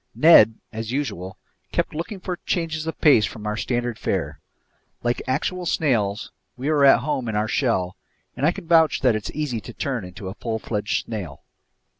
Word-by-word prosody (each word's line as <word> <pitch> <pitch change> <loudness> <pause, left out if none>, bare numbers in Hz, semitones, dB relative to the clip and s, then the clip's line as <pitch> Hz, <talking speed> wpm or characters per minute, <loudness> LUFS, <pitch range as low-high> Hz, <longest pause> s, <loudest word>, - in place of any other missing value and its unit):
Ned, 115 -9 +7 0.2
as 110 +1 -4
usual, 95 -10 -3 0.3
kept - - -1
looking 175 +6 -5
for 180 -1 -4
changes 160 -2 -2
of 160 - -4
pace 145 -8 +6
from 105 +1 -4
our 105 0 -1
standard 120 0 -2
fare. - - -2 0.6
Like 120 0 0
actual 175 +7 -1
snails, 110 -11 0 0.3
we 135 +5 -1
were 145 -2 +4
at 135 - +7
home 135 -5 -2
in 110 - -3
our 105 +1 +1
shell, 110 -7 0 0.4
and 125 - -6
I 155 - +5
can 190 -1 -9
vouch 160 -1 +4
that 125 -4 +3
it's 110 - -4
easy 140 -7 -2
to 120 - -10
turn 125 -4 -3
into 95 +2 -8
a 95 - -5
full 110 +1 -3
fledged 105 -2 -2
snail. 95 -11 -6
120 Hz, 185 wpm, -23 LUFS, 105-155 Hz, 0.6 s, Ned